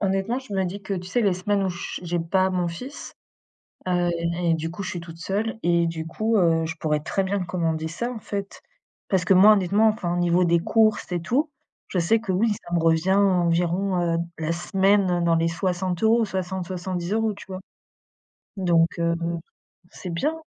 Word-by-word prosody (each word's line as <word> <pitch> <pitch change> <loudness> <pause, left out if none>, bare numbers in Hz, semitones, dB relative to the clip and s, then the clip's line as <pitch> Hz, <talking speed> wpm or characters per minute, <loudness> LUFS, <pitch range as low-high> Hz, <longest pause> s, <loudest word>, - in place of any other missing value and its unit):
honnêtement, 195 +5 0
je 260 -6 -11
me 190 -1 +1
dis 195 +3 -5
que, 195 +1 -3
tu 180 -1 -5
sais, 220 +7 +1
les 200 -5 +2
semaines 200 +2 0
où - - 0
je 175 -1 -5
j'ai 175 0 -2
pas 185 +3 +1
mon 180 -2 0
fils, 250 - -8 0.7
heu 175 -1 +1 0.3
et 170 -1 +3
du 165 0 -3
coup, 175 +4 -6
je - - -4
suis 175 - -5
toute 165 -1 -11
seule 205 +6 -2
et 170 0 +2
du 160 -1 -4
coup, 220 +7 0
heu, 165 -3 +3
je 160 0 -4
pourrais 150 -1 0
très 175 +6 -1
bien 190 -1 -1
commander 160 -2 -1
ça, 235 +10 -3
en 245 - -6
fait. 200 -1 -6 0.5
Parce 185 -2 +1
que 190 - +4
moi, 200 +4 +8
honnêtement, 205 +2 +3
enfin, 200 -6 -1
au - - -1
niveau 175 +1 +3
des 170 0 +3
courses 215 +3 +2
et 175 - 0
tout, 265 - 0 0.4
je 185 - -2
sais 175 +7 +3
que, 215 -4 -3
oui, 215 +5 +2
ça 175 - -5
me 170 - +2
revient 165 +3 +2
environ, 180 -1 +2
heu, 170 -1 +1 0.2
la 160 +1 -1
semaine 190 0 +2
dans 165 -1 +3
les 165 0 +2
60€, 185 +6 +1
60-70€, 190 +2 -2
tu - - -12
vois? 185 -1 -7 1.0
Donc, 170 -3 +3
heu, 170 0 +1
mmh, 170 0 -3 0.5
c'est 180 - -8
bien. 290 - -1
180 Hz, 200 wpm, -24 LUFS, 170-200 Hz, 1.0 s, moi